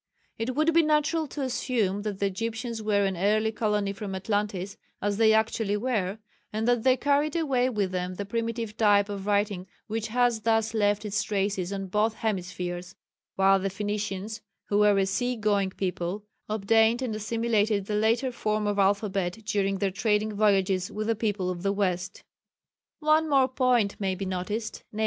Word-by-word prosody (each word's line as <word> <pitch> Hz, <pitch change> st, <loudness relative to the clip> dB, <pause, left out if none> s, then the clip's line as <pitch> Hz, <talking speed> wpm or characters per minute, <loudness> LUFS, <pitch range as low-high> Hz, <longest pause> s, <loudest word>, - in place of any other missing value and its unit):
It 240 Hz, +3 st, -2 dB
would 310 Hz, +3 st, +2 dB
be 335 Hz, -, +6 dB
natural 310 Hz, +1 st, +1 dB
to 285 Hz, 0 st, -5 dB
assume 230 Hz, -6 st, -1 dB
that 205 Hz, -2 st, -4 dB
the 200 Hz, -, 0 dB
Egyptians 225 Hz, +3 st, -3 dB
were 205 Hz, -2 st, +2 dB
an 190 Hz, -1 st, -1 dB
early 215 Hz, +4 st, +2 dB
colony 210 Hz, -2 st, 0 dB
from 200 Hz, -1 st, -5 dB
Atlantis 200 Hz, -1 st, -2 dB, 0.2 s
(as 205 Hz, -1 st, -1 dB
they 220 Hz, -1 st, +5 dB
actually 220 Hz, -1 st, +1 dB
were) 210 Hz, -4 st, -1 dB, 0.3 s
and 220 Hz, +2 st, -2 dB
that 245 Hz, -1 st, +3 dB
they 260 Hz, +2 st, +4 dB
carried 290 Hz, +3 st, +1 dB
away 265 Hz, -6 st, +1 dB
with 205 Hz, -6 st, -1 dB
them 180 Hz, 0 st, -3 dB
the 200 Hz, -, -4 dB
primitive 230 Hz, 0 st, -3 dB
type 205 Hz, -2 st, +4 dB
of 200 Hz, -1 st, -5 dB
writing 205 Hz, -2 st, 0 dB, 0.2 s
which 220 Hz, 0 st, -3 dB
has 240 Hz, -1 st, +1 dB
thus 225 Hz, 0 st, +1 dB
left 205 Hz, -1 st, +1 dB
its 210 Hz, 0 st, 0 dB
traces 195 Hz, -3 st, -1 dB
on 195 Hz, -1 st, -3 dB
both 210 Hz, +4 st, 0 dB
hemispheres, 180 Hz, -3 st, -4 dB, 0.4 s
while 195 Hz, 0 st, +4 dB
the 195 Hz, +1 st, -1 dB
Phoenicians, 205 Hz, +1 st, -4 dB, 0.3 s
who 205 Hz, -, +2 dB
were 210 Hz, -1 st, +5 dB
a 195 Hz, -, +3 dB
sea 245 Hz, +6 st, -1 dB
going 205 Hz, -3 st, +1 dB
people, 185 Hz, +1 st, -3 dB, 0.3 s
obtained 225 Hz, +3 st, +3 dB
and 230 Hz, -4 st, -2 dB
assimilated 215 Hz, -2 st, 0 dB
the 210 Hz, -, -4 dB
later 225 Hz, +5 st, +2 dB
form 215 Hz, -2 st, -1 dB
of 205 Hz, -1 st, 0 dB
alphabet 195 Hz, -2 st, +1 dB
during 195 Hz, -1 st, 0 dB
their 195 Hz, 0 st, 0 dB
trading 210 Hz, +1 st, 0 dB
voyages 195 Hz, -3 st, +2 dB
with 215 Hz, +1 st, -3 dB
the 225 Hz, +1 st, +1 dB
people 205 Hz, -4 st, -1 dB
of 175 Hz, -1 st, -6 dB
the 195 Hz, +1 st, +1 dB
west. 185 Hz, -1 st, -2 dB, 0.8 s
One 310 Hz, +1 st, +3 dB
more 270 Hz, -2 st, +4 dB
point 250 Hz, -5 st, +1 dB
may 190 Hz, -2 st, -1 dB
be 195 Hz, +1 st, -4 dB
noticed, 190 Hz, +4 st, -4 dB
_viz. 215 Hz, -, -7 dB
210 Hz, 175 wpm, -27 LUFS, 195-225 Hz, 0.8 s, be